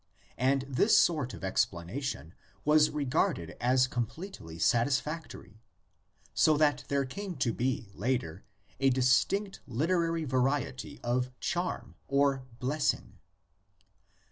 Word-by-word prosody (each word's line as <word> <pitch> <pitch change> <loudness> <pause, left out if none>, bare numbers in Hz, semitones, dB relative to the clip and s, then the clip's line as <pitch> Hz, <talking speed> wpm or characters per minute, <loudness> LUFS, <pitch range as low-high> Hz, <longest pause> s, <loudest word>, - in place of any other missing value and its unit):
And 135 +2 +2
this 140 - +3
sort 150 -7 +3
of - - -12
explanation 90 - -2 0.3
was 150 0 +5
regarded 145 - -1
as 125 +1 +4
com 120 -3 -2
pletely 130 - -9
satisfactory, 120 - -1 0.7
so 155 -2 +4
that 150 -1 +2
there 140 -1 +1
came 195 +6 -6
to 115 -6 0
be 125 -4 -2
later 105 -7 -2 0.4
a 135 - +4
distinct 130 +11 +2
literary 165 +5 0
variety 130 -1 -1
of 125 +1 0
"charm" 175 +1 -2
or 140 -2 +1
'"bless 140 +4 +1
ing." - - -17
135 Hz, 115 wpm, -30 LUFS, 120-155 Hz, 0.7 s, was